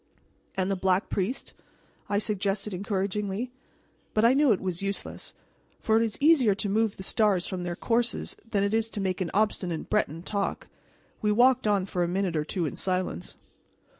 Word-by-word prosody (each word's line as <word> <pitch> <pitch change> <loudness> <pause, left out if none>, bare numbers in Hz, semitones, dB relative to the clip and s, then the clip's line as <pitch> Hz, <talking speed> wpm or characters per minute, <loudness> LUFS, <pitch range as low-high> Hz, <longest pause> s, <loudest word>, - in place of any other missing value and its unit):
"And 190 +1 +1
the - - +1
Black 185 +1 +1
Priest?" 205 +7 -2 0.6
I 205 - +1
suggested 205 -1 -1
encouragingly. 200 +3 -2 0.6
But 215 +1 +4
I 240 - +6
knew 280 -1 +4
it 200 - +3
was 185 -2 -3
useless; 195 0 -4 0.4
for 220 0 +3
it - - +3
is 225 -2 -2
easier 280 -9 +5
to 205 0 -2
move 220 +1 +1
the 190 - -7
stars 195 -3 +2
from 185 -1 -4
their 175 -1 -3
courses 235 +4 -1
than 200 -2 +2
to 225 0 -1
make 190 -1 -1
an 175 - -1
obstinate 190 -5 0
Breton 170 -6 0
talk. 200 0 -2 0.5
We 210 - +2
walked 250 +2 +4
on 200 -3 +2
for 185 -2 -2
a - - 0
minute 185 -1 -1
or 155 - +1
two 170 +2 -2
in 150 - -3
silence. 185 - -2
200 Hz, 175 wpm, -27 LUFS, 185-220 Hz, 0.6 s, I